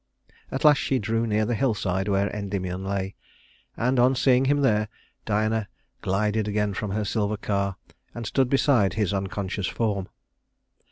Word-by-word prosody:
At 135 - -3
last 150 -2 +7
she 135 - +1
drew 115 +1 0
near 110 0 +1
the 120 - 0
hillside 105 -6 0
where 100 0 +2
Endymion 95 -2 -3
lay, 95 0 -2 0.6
and, 125 +2 +1
on 130 +2 +5
seeing 130 0 +4
him 145 +1 +2
there, 105 -5 +2 0.4
Diana 110 0 0 0.3
glided 105 +2 0
again 105 -1 0
from 105 +2 -3
her 105 +2 -1
silver 105 0 -1
car 100 -2 -1 0.4
and 120 -1 -5
stood 130 +3 +1
beside 130 - +3
his 105 -4 0
unconscious 95 -1 -2
form. 100 -5 -1
105 Hz, 155 wpm, -25 LUFS, 100-120 Hz, 0.6 s, last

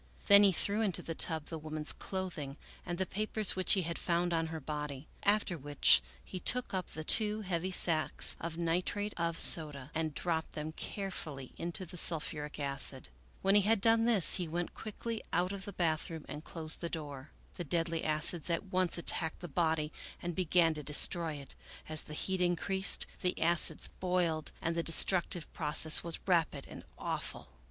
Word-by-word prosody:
Then 200 0 +7
he 200 -1 +5
threw 205 +4 0
into 200 -5 0
the 165 - -5
tub 160 -2 -1
the 160 - -6
woman's 155 0 -3
clothing 170 -7 -6 0.3
and 175 -1 -3
the 190 - -1
papers 215 +1 -1
which 185 0 +2
he 190 - +1
had 170 +1 -4
found 175 0 -1
on 165 -1 0
her 160 0 -6
body, 150 -1 -6
after 205 -4 +1
which 145 - +4 0.2
he 185 - -7
took 250 +6 +2
up 185 -2 -2
the 155 - -8
two 215 +4 +5
heavy 185 -2 -3
sacks 160 -5 +1
of 165 0 -5
nitrate 180 +5 -2
of 170 -1 -2
soda 150 -5 +3
and 160 -2 -3
dropped 165 -2 -3
them 155 +1 -5
carefully 160 -8 -6
into 175 +3 -1
the 180 - -10
sulphuric 150 -3 +3
acid. 140 - -2 0.3
When 195 +1 +3
he 205 - +6
had 215 +2 +2
done 225 +2 +3
this 220 -7 +6
he 180 -3 -3
went 170 +2 -4
quickly 225 +1 -6
out 180 +2 0
of 195 -1 -7
the 205 - -6
bath 160 -4 -1
room 160 -2 -8
and 150 +1 -8
closed 160 -2 -2
the 170 - -3
door. 145 -3 -7 0.3
The 175 - -4
deadly 165 +1 -2
acids 155 +2 +3
at 170 +3 -1
once 185 -1 0
attacked 165 -1 +1
the 175 - -6
body 160 -1 -1 0.3
and 175 0 -5
began 170 -2 +2
to 155 - -7
destroy 155 +2 +3
it; 140 -1 -10 0.3
as 155 -1 -3
the 150 - -9
heat 190 +3 -2
increased, 190 +2 +2
the 180 -1 -1
acids 170 0 +1
boiled 175 -4 -1
and 165 - -1
the 170 - 0
destructive 170 0 +3
process 155 0 +2
was 170 -1 -3
rapid 165 -6 0
and - - -11
awful. - - -4
170 Hz, 185 wpm, -32 LUFS, 155-185 Hz, 0.3 s, Then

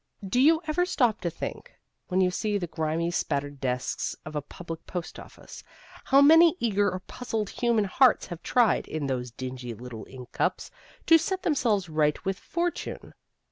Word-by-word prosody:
Do 245 +6 +1
you 320 +4 +5
ever 320 +3 +1
stop 245 - +1
to 175 - -1
think, - - -7 0.3
when 185 +1 +1
you 180 -1 +3
see 210 +2 -1
the 185 - -3
grimy 165 +1 -2
spattered 145 -4 -2
desks 125 -1 -2
of 155 - -8
a 150 - -1
public 165 +3 -9
post 175 -3 -5
office, - - -12 0.4
how 275 0 +6
many 325 +3 +7
eager 205 -3 +2
or 185 0 -5
puzzled 220 -1 -4
human 235 -3 +1
hearts 250 +6 +4
have 175 -2 -8
tried, 240 -3 +2
in 155 -2 -3
those 125 -2 -2
dingy 125 0 -6
little 115 -2 -9
ink 130 -1 -11
cups, - - -1 0.3
to 330 0 +7
set 375 +3 -2
themselves 230 - +1
right 155 +2 0
with 195 0 -2
fortune? 345 +1 -4
185 Hz, 175 wpm, -27 LUFS, 150-250 Hz, 0.4 s, many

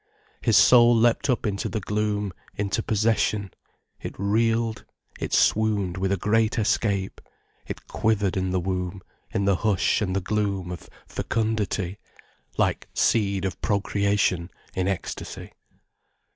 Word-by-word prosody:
His - - +4
soul 120 -1 +7
leapt 115 +3 +2
up 125 - +1
into 100 -2 -1
the 110 - -2
gloom, 105 -1 -1 0.2
into 100 +2 -1
possession, 105 -2 0 0.5
it - - -7
reeled, 115 +3 +1 0.4
it - - -4
swooned 105 -4 +2
with 95 +1 0
a 100 - +2
great 110 +5 +1
escape, 100 -3 0 0.5
it - - -7
quivered 105 -4 0
in 95 -1 0
the 90 0 0
womb, 90 +1 -3 0.3
in 100 - 0
the 100 -2 +3
hush 105 -1 +1
and 95 -3 -1
the - - +2
gloom 100 -2 -1
of 90 - -8 0.2
fecundity, 105 -4 -2 0.6
like - - 0
seed 100 -3 +2
of 95 - -4
procreation 100 -3 +1 0.2
in 95 0 -1
ecstasy. 95 -2 -5
100 Hz, 130 wpm, -25 LUFS, 95-110 Hz, 0.6 s, soul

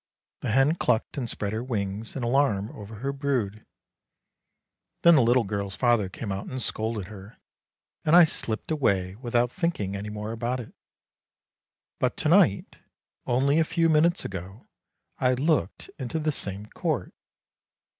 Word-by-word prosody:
The - - -3
hen 135 +6 +4
clucked 125 -7 0
and 120 -3 -3
spread 100 -1 -3
her 110 +2 -2
wings 105 -3 -3
in 135 - -3
alarm 120 -5 +1
over 105 +1 -10
her 135 +6 -3
brood. 125 -7 -2 1.4
Then 170 - +8
the 150 - +6
little 120 +1 +4
girl's 100 -1 -3
father 110 -1 +2
came 100 +2 -6
out 95 0 -4
and 130 - -4
scolded 110 -4 -2
her, 100 +1 -12 0.7
and 155 - +4
I 175 - +10
slipped 115 -5 -2
away 100 -11 +1
without 120 +2 0
thinking 165 - -2
any 100 +1 -5
more 105 +1 -5
about 120 +3 -2
it. 115 - -9 1.3
But - - 0
to - - 0
night, - - +3 0.5
only 140 +5 +3
a - - +5
few 165 +1 +1
minutes 165 +3 +3
ago, 95 +3 -7 0.5
I 130 -1 +3
looked 140 - 0
into 130 +4 -3
the 155 0 0
same 100 -6 -5
court. - - -3
115 Hz, 155 wpm, -26 LUFS, 100-140 Hz, 1.4 s, I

